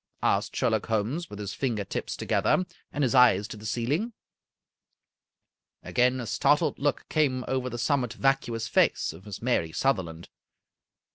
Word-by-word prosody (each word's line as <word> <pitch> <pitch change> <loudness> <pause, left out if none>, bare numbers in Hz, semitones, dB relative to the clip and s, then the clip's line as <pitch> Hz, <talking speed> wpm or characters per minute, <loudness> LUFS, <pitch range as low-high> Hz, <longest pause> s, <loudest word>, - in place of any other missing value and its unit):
asked - - +1
Sherlock - - +1
Holmes, 115 +10 -1
with 105 - -8
his 100 -2 -5
finger 115 -6 -1
tips - - -4
to - - -6
gether, 185 - +2 0.3
and 145 - -1
his 130 - +1
eyes 120 -6 +5
to - - -6
the 105 0 -8
ceiling. 140 - -1 1.7
Again 125 +1 +2
a 120 - -4
startled 145 +7 +2
look 145 0 -1
came 135 -5 +1
over 130 -1 -1
the 120 - -5
somewhat 125 0 0
vacuous 120 -5 0
face - - +2
of 95 +6 -14
Miss 105 +2 -7
Mary 115 -10 +1
Sutherland. 85 -9 -1
125 Hz, 155 wpm, -27 LUFS, 105-135 Hz, 1.7 s, eyes